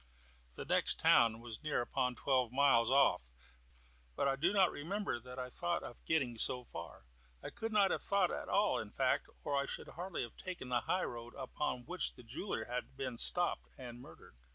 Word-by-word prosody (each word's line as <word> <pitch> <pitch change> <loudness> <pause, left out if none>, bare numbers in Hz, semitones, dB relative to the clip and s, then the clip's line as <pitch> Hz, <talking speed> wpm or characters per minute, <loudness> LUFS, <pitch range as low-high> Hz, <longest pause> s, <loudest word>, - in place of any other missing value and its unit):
The - - -5
next - - +5
town 115 -1 +4
was 115 -2 -3
near 155 -4 -1
upon 125 +1 -1
twelve 130 -3 +1
miles 130 -4 +4
off, 130 - +3 0.9
but - - +1
I 135 - +2
do 170 +7 +2
not 195 -3 +4
remember 195 - -3
that 125 +1 -11
I 125 -1 -5
thought 175 +3 -1
of 120 - -10
getting 130 -8 0
so 125 +2 0
far. 85 - -9 0.4
I - - -6
could 225 -1 -4
not 200 -3 +4
have - - -1
thought 200 0 +2
at - - -5
all, - - +2
in - - -6
fact, - - 0
or 145 - -1
I 140 0 0
should - - -5
hardly 180 +1 -4
have 120 - -9
taken 180 -9 -6
the 125 -1 +2
high 185 +8 0
road 120 0 -7
upon 130 -2 -3
which 180 +1 0
the - - -13
jeweller 120 - -4
had 125 +1 -5
been 130 -2 -3
stopped 175 +8 +2
and 120 -2 -9
murdered. 80 - -15
130 Hz, 200 wpm, -35 LUFS, 120-170 Hz, 0.9 s, next